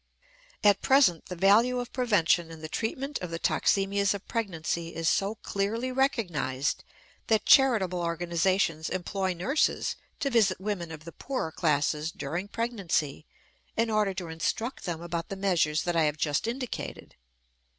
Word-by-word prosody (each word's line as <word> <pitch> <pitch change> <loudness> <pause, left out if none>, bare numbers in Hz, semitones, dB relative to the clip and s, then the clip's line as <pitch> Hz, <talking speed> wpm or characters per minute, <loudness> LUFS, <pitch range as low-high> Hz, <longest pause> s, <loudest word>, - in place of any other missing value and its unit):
At 205 -1 +5
present 265 - +4
the 180 - -5
value 210 +7 +4
of 245 0 -6
prevention 200 -9 +2
in 165 -1 -10
the 155 - -5
treatment 260 - -3
of 180 - -5
the 165 - -3
toxemias 200 +3 +1
of 200 - -9
pregnancy 170 -6 -3
is 165 0 -2
so 200 +5 +1
clearly 225 +6 -1
recognized 175 - 0 0.4
that 220 -1 +2
charitable 220 -10 +5
organizations 170 -1 0
employ 185 0 -2
nurses 270 - 0 0.2
to 275 - -1
visit 205 -7 +3
women 190 -4 -3
of 155 -1 -9
the 170 - -8
poorer 255 -10 -4
classes 150 0 0
during 180 +5 -4
pregnancy 200 - -2 0.5
in 230 0 +1
order 210 -3 +1
to 175 -2 -5
instruct 175 +11 -3
them 170 -2 -4
about 170 -1 -4
the 195 - -4
measures 175 -5 +1
that 175 -1 -1
I 165 -2 +4
have 150 0 0
just 150 +4 0
indicated. 250 +1 -5
190 Hz, 150 wpm, -28 LUFS, 165-225 Hz, 0.5 s, At